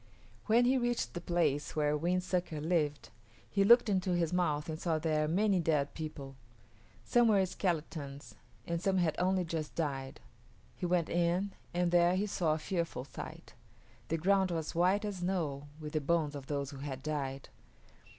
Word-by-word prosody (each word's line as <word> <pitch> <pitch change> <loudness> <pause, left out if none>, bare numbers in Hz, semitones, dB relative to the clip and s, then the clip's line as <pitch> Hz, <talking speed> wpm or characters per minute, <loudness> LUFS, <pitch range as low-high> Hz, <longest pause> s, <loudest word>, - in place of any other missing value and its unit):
When 235 +2 +5
he 260 +1 +3
reached 240 - -1
the 175 - -5
place 155 -5 0
where 150 -1 +2
Wind 175 +4 0
Sucker 180 -4 -2
lived, 150 -2 0 0.4
he 200 - +2
looked 235 +4 +7
into 185 -3 +1
his 170 -1 0
mouth 155 -5 0
and 160 -1 -4
saw 165 -3 0
there 155 -1 +1
many 195 +3 +2
dead 150 -4 +1
people. 145 -4 -7 0.7
Some 240 -1 +4
were 200 -3 +4
skeletons 155 -6 -3 0.3
and 170 0 -2
some 195 -1 +1
had 170 -4 +2
only 185 0 +2
just 160 -2 -4
died. 135 -4 -3 0.6
He 180 - -3
went 175 -2 +2
in, 175 +3 +1 0.2
and 175 0 +1
there 175 +1 +4
he 195 +3 +1
saw 170 -6 +1
a - - -2
fearful 165 -5 -3
sight. - - -9 0.5
The 165 - 0
ground 190 +3 +3
was 165 -3 -3
white 185 +5 +2
as 205 -2 -3
snow 165 -6 -2
with 150 -1 -7
the 155 - +1
bones 155 0 +1
of 140 -2 -8
those 140 -1 -2
who 140 - -9
had 135 -1 -6
died. 140 -3 -3
170 Hz, 175 wpm, -32 LUFS, 150-185 Hz, 0.7 s, looked